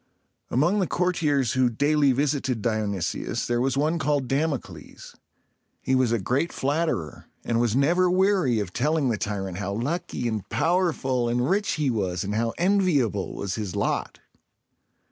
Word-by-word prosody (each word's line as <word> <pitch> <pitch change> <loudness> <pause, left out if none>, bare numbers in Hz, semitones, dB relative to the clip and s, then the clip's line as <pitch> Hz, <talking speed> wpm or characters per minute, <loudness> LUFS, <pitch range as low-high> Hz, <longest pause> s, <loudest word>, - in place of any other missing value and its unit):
Among 170 +11 +2
the 185 - +1
courtiers 155 -8 +1
who 130 -1 +3
daily 145 +4 +2
visited 130 -4 -1
Dionysius 105 -6 -2
there 120 0 0
was 135 +1 0
one 155 +4 +1
called 145 -4 0
Dam´o 145 +2 +1
cles. - - -13 0.7
He 130 - -1
was 130 -3 +3
a 115 - +2
great 130 - -1
flatterer, 140 - -2 0.2
and 115 -1 0
was 120 -2 +1
never 170 +7 +3
weary 185 - +2
of 95 -3 -4
telling 150 +1 +1
the 115 - 0
tyrant 95 -3 -3
how 100 -1 -3
lucky 125 - -2
and 110 -4 -4
powerful 155 -9 +1
and 120 +2 0
rich 200 +3 +1
he 150 -4 0
was, 95 -5 -1
and 100 +1 -3
how 115 +1 0
enviable 170 - +1
was 100 -1 -3
his 105 -5 -4
lot. - - -2
130 Hz, 160 wpm, -25 LUFS, 110-155 Hz, 0.7 s, who